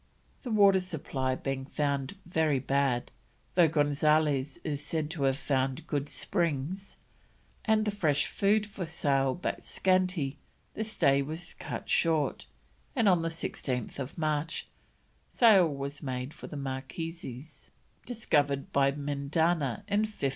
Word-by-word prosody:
The 250 Hz, -, -6 dB
water 200 Hz, -3 st, +6 dB
supply 140 Hz, -7 st, -2 dB
being 135 Hz, 0 st, -3 dB
found 140 Hz, +2 st, -1 dB
very 160 Hz, -4 st, +2 dB
bad, 135 Hz, -2 st, 0 dB, 0.4 s
though 175 Hz, -2 st, +6 dB
Gonzales 145 Hz, -2 st, +2 dB
is 145 Hz, -2 st, -3 dB
said 155 Hz, -1 st, -2 dB
to 150 Hz, -5 st, -1 dB
have 135 Hz, 0 st, +2 dB
found 135 Hz, 0 st, -1 dB
good 145 Hz, -3 st, -2 dB
springs, 175 Hz, +1 st, -2 dB, 0.7 s
and 220 Hz, -1 st, +3 dB
the 210 Hz, -, +1 dB
fresh 155 Hz, -8 st, +1 dB
food 210 Hz, +2 st, +2 dB
for 195 Hz, -4 st, -6 dB
sale 135 Hz, -3 st, +1 dB
but 180 Hz, -, -3 dB
scanty, 185 Hz, -7 st, +1 dB, 0.3 s
the 220 Hz, -, -2 dB
stay 145 Hz, -11 st, +3 dB
was 160 Hz, +5 st, -5 dB
cut -, -, -6 dB
short, 160 Hz, -4 st, +1 dB, 0.5 s
and 225 Hz, -, +3 dB
on 180 Hz, -3 st, +5 dB
16th 140 Hz, -5 st, -3 dB
March 155 Hz, 0 st, -1 dB, 0.6 s
sail 210 Hz, -7 st, +6 dB
was 140 Hz, +1 st, -5 dB
made 130 Hz, 0 st, -4 dB
for -, -, -9 dB
the 150 Hz, -, -7 dB
Marquesas, 135 Hz, +1 st, -6 dB, 0.4 s
discovered 145 Hz, -, 0 dB
by 140 Hz, 0 st, +4 dB
Mendana 145 Hz, +4 st, 0 dB
in 205 Hz, 0 st, +2 dB
1595. 215 Hz, -5 st, -4 dB
150 Hz, 130 wpm, -30 LUFS, 140-175 Hz, 0.7 s, water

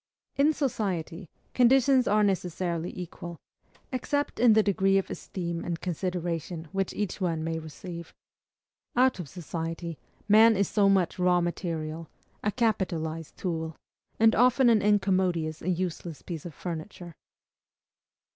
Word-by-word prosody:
In 285 Hz, +3 st, +4 dB
society, 190 Hz, -, -2 dB, 0.2 s
conditions 260 Hz, +1 st, +4 dB
are 210 Hz, +1 st, +4 dB
necessarily 180 Hz, -3 st, -1 dB
equal, 175 Hz, -1 st, -7 dB, 0.5 s
except 285 Hz, +3 st, -2 dB
in 235 Hz, -1 st, +6 dB
the 220 Hz, 0 st, +5 dB
degree 195 Hz, -1 st, +3 dB
of 195 Hz, -, -1 dB
esteem 170 Hz, -2 st, -4 dB
and 170 Hz, -1 st, -3 dB
consideration 175 Hz, -2 st, -3 dB
which 195 Hz, -1 st, -1 dB
each 205 Hz, -1 st, -3 dB
one 165 Hz, -3 st, 0 dB
may 165 Hz, 0 st, -2 dB
receive. 170 Hz, +2 st, -8 dB, 0.8 s
Out 255 Hz, -4 st, +3 dB
of 165 Hz, -6 st, -6 dB
society, 165 Hz, -1 st, -5 dB, 0.3 s
man 220 Hz, +2 st, +7 dB
is 200 Hz, -, +2 dB
so 200 Hz, -2 st, +3 dB
much 190 Hz, -2 st, +2 dB
raw 180 Hz, 0 st, +4 dB
material, 165 Hz, -2 st, -3 dB, 0.3 s
a 210 Hz, -, +1 dB
capitalized 170 Hz, -9 st, -1 dB
tool, 160 Hz, -3 st, -3 dB, 0.4 s
and 225 Hz, 0 st, +6 dB
often 250 Hz, +1 st, +5 dB
an 220 Hz, -2 st, +4 dB
incommodious 185 Hz, -6 st, +1 dB
and 180 Hz, 0 st, 0 dB
useless 170 Hz, -5 st, -4 dB
piece 170 Hz, -2 st, -6 dB
of 165 Hz, -, -11 dB
furniture. 175 Hz, 0 st, -6 dB
180 Hz, 130 wpm, -28 LUFS, 165-210 Hz, 0.8 s, man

